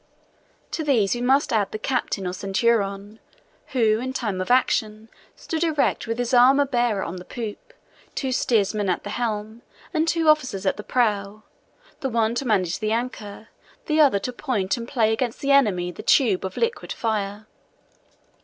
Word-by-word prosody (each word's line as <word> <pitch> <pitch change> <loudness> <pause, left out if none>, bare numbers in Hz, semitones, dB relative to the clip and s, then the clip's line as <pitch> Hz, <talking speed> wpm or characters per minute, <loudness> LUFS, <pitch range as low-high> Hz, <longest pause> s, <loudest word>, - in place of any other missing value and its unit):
To 320 - -2
these 235 -10 +2
we 240 - -3
must 270 +2 +2
add 210 -3 +1
the - - -4
captain 215 -4 -2
or 180 - -2
centurion, 200 +1 -1 0.5
who, 225 -5 +2
in 260 +2 -4
time 210 -8 -2
of 185 - -4
action, 220 -3 +1 0.3
stood 325 0 -3
erect 310 -7 0
with 230 0 -2
his 245 +1 -2
armor 265 +3 +6
bearer 240 -6 0
on 170 +2 -5
the 180 - -8
poop, 235 - -7 0.4
two 265 -2 -2
steersmen 210 -5 +1
at 180 - -1
the 205 - -6
helm, 220 -1 -3 0.3
and 320 0 +1
two 330 -1 +1
officers 255 -10 +2
at 190 - +1
the 210 - -7
prow, 210 -3 -1 0.6
the 270 - -2
one 230 -1 +1
to 245 +2 -3
manage 185 -6 +1
the 215 0 -1
anchor, 220 -3 -4 0.4
the 310 0 +3
other 275 -9 +5
to 250 +6 -4
point 220 -8 -1
and 235 -1 -7
play 225 -4 +1
against 235 +1 -2
the 280 -1 0
enemy 200 -11 +3
the - - -9
tube 215 -10 +3
of 190 - -6
liquid 465 +1 -2
fire. 210 -2 -2
225 Hz, 175 wpm, -23 LUFS, 205-260 Hz, 0.6 s, armor